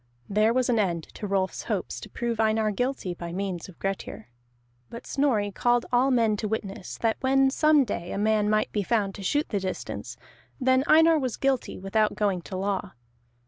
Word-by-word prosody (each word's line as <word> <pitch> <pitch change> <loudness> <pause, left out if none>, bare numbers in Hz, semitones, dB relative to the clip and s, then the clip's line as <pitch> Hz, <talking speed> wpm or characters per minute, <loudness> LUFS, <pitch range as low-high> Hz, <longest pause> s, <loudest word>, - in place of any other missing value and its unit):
There 215 +2 +3
was 255 +1 +1
an 240 -3 +2
end 170 -5 0
to 210 - -5
Rolf's 190 -1 -1
hopes - - -3
to - - -10
prove 235 -2 -3
Einar 220 -1 +2
guilty 245 -3 -2
by 170 0 -7
the 170 - -6
means 190 -2 -4
of 180 - -14
Grettir. 195 - -5 0.6
But 235 - -9
Snorri 235 -8 +1
called 240 +4 +1
all 250 +2 +4
men 230 -5 +2
to 215 - -2
witness 205 -2 -5
that 225 -1 +1
when 270 0 +3
some 305 0 +4
day 175 -7 -4
a - - -3
man 210 0 +2
might 215 0 +1
be 210 - 0
found 200 -1 0
to 200 - -9
shoot 290 +10 0
the 205 - 0
distance, 185 -1 -5 0.4
then 260 0 +3
Einar 320 0 +6
was 255 -4 -2
guilty 270 -2 0
without 210 +3 0
going 200 -4 0
to 185 +2 -7
law. 195 0 -2
215 Hz, 195 wpm, -26 LUFS, 195-250 Hz, 0.6 s, Einar